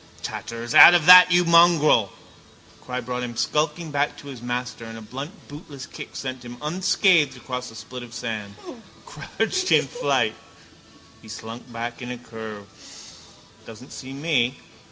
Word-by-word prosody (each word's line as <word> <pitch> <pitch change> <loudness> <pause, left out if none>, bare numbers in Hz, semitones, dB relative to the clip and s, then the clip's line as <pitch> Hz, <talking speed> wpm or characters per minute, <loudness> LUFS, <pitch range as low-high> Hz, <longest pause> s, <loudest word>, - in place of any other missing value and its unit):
—Tatters! 115 +1 -6
Out 175 - +10
of 165 -3 +2
that, 180 +1 +9
you 175 0 +4
mongrel! 170 - +4 0.7
The - - -24
cry 125 0 -4
brought 125 +1 -5
him 120 -1 -6
skulking 155 +4 -1
back 145 0 -1
to 145 - -11
his 130 -4 -10
master 125 0 -5
and 115 0 -9
a - - -10
blunt 140 - -9
bootless 145 -2 -10
kick - - -11
sent 130 -2 -6
him 120 0 -10
unscathed 180 -1 +2
across 125 -1 -6
a 115 - -14
spit 120 +3 -9
of 120 -1 -11
sand, 110 -4 -6 0.5
crouched 375 -6 -3
in - - +4
flight. - - -1 0.9
He - - -16
slunk 115 +3 -9
back 120 +2 -6
in 125 - -7
a 125 - -5
curve. 110 -3 -10 1.0
Doesn't 115 +4 -12
see 130 0 -9
me. 140 -4 0
125 Hz, 160 wpm, -23 LUFS, 115-155 Hz, 1.0 s, Out